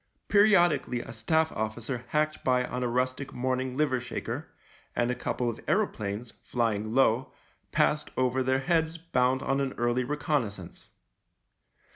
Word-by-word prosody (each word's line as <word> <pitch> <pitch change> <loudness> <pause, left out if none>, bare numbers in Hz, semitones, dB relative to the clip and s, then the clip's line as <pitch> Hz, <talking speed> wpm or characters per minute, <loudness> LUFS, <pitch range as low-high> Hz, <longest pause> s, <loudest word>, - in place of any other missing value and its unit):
Periodic 200 -4 +5
ally 125 - -2
a - - -8
Staff 160 +8 +1
officer 115 +3 -3
hacked 155 +2 0
by 125 -1 +2
on 125 0 -4
a 125 - +1
rustic 130 +3 -1
morn 130 +1 0
ing 130 0 -4
liver 145 -4 +2
shaker, 125 - -5 0.5
and 120 +1 +1
a - - +1
couple 125 0 -2
of 115 - -2
aeroplanes, 115 - -1
flying 110 -2 -1
low, 130 -1 +3 0.4
passed 150 0 +2
over 130 0 +2
their 130 +1 +1
heads 165 +1 +1
bound 130 -5 +1
on 135 +1 +1
an 135 -1 -1
early 120 +1 +1
reconnaissance. 125 - -3
130 Hz, 150 wpm, -28 LUFS, 120-150 Hz, 0.5 s, Periodic